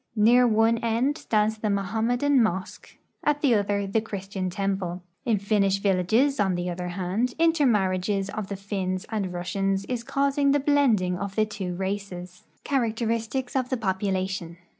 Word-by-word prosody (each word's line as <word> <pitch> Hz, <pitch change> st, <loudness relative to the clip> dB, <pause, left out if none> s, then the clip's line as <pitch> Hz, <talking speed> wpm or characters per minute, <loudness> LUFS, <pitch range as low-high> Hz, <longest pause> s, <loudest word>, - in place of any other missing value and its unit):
Near 240 Hz, +3 st, +5 dB
one 225 Hz, +1 st, +3 dB
end 235 Hz, +5 st, +1 dB
stands 215 Hz, 0 st, 0 dB
the 215 Hz, -, -1 dB
Mohammedan 230 Hz, +7 st, +1 dB
mosque; 190 Hz, -4 st, -3 dB, 0.3 s
at 295 Hz, 0 st, +1 dB
the 275 Hz, -5 st, +4 dB
other 200 Hz, -1 st, +1 dB
the 200 Hz, +3 st, 0 dB
Christian 195 Hz, -3 st, -4 dB
temple. 190 Hz, -2 st, -2 dB, 0.2 s
In 230 Hz, -4 st, +2 dB
Finnish 200 Hz, -1 st, +1 dB
villages, 205 Hz, +8 st, +2 dB
on 190 Hz, -3 st, +2 dB
the 175 Hz, 0 st, -2 dB
oth^r 180 Hz, 0 st, -4 dB
hand, 195 Hz, +7 st, -1 dB
intermarriages 205 Hz, -, +2 dB
of 215 Hz, -2 st, -4 dB
the 200 Hz, -, -4 dB
Finns 190 Hz, -2 st, -3 dB
and 200 Hz, -4 st, -2 dB
Russians 195 Hz, +2 st, -1 dB
is 245 Hz, -2 st, -3 dB
causing 280 Hz, +2 st, +1 dB
the 290 Hz, -, +3 dB
blend 280 Hz, -7 st, +3 dB
ing 180 Hz, 0 st, -2 dB
of 200 Hz, 0 st, -5 dB
the 215 Hz, -, +3 dB
two 195 Hz, -4 st, -5 dB
races. 190 Hz, -1 st, -5 dB, 0.2 s
CH.\RACTERISTICS 230 Hz, 0 st, -1 dB
OF 255 Hz, -1 st, 0 dB
THE 260 Hz, -, 0 dB
POPULATION. 190 Hz, -4 st, -2 dB
205 Hz, 160 wpm, -26 LUFS, 190-235 Hz, 0.3 s, Near